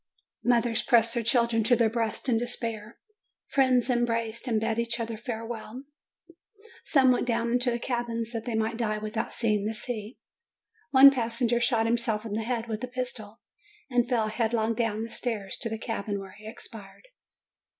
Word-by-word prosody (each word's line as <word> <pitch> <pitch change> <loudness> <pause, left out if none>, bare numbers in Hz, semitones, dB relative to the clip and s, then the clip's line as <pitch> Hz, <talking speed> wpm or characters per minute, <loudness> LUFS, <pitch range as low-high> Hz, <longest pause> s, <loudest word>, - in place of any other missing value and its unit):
Mothers 235 -2 +2
pressed 230 -2 +3
their 235 - 0
children 235 -1 +2
to 245 +3 +4
their 230 -1 +3
breasts 225 +2 -2
in 230 -3 +2
despair. 230 -2 -4 0.5
Friends 260 -3 +2
embraced 235 -1 -1
and 225 -3 +1
bade 225 +1 -1
each 235 +1 -1
other 230 -1 -3
farewell. 230 +1 -6 1.0
Some 265 -3 +4
went 250 - 0
down 235 0 0
into 245 +1 +3
the 235 - 0
cabins 235 -2 -3
that 230 -2 -5
they 240 -3 -2
might 220 +1 -1
die 215 -3 -1
without 215 +2 -3
seeing 210 -3 0
the 220 - -3
sea. 220 0 -5 0.7
One 275 0 +9
passenger 240 -1 0
shot 235 -2 +2
himself 230 -2 0
in 215 - -5
the 220 - -1
head 235 0 -2
with 220 +1 -4
a - - -2
pistol, 245 -4 -6 0.5
and 245 0 +2
fell 225 -4 +1
headlong 225 0 0
down 225 -1 -1
the 230 - -6
stairs 215 -7 -3
to 230 - -3
the 220 - -3
cabin, 210 -3 -3
where 195 -1 -9
he 210 +2 -13
expired. 220 - -12
230 Hz, 175 wpm, -27 LUFS, 220-240 Hz, 1.0 s, One